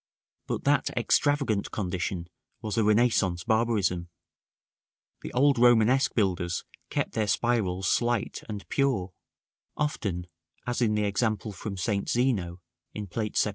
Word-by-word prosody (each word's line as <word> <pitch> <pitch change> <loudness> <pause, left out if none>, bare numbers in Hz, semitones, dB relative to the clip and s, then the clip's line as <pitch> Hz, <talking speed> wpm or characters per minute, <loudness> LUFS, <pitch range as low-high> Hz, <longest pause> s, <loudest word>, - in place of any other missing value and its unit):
But - - -3
that - - +2
extravagant 140 -8 +1
condition 90 -2 -3 0.3
was 105 -3 -4
a 115 - +2
Renaissance 105 -5 +2
barbarism: 110 -6 +1 1.1
the - - -6
old 135 0 +3
Romanesque 120 +2 +4
builders 90 -5 0 0.3
kept - - -1
their 110 -2 0
spirals 100 -4 0
slight 120 -2 0
and 105 -2 -6
pure; 115 -10 0 0.6
often, 100 - -2 0.4
as 125 0 -2
in 110 -3 +2
the 105 - +1
example 105 +1 -1
from 100 +1 -6
St. 100 +2 -1
Zeno, 100 -9 0 0.3
in 105 - -4
Plate 105 +3 -3
XVII. - - +3
105 Hz, 130 wpm, -27 LUFS, 95-120 Hz, 1.1 s, Romanesque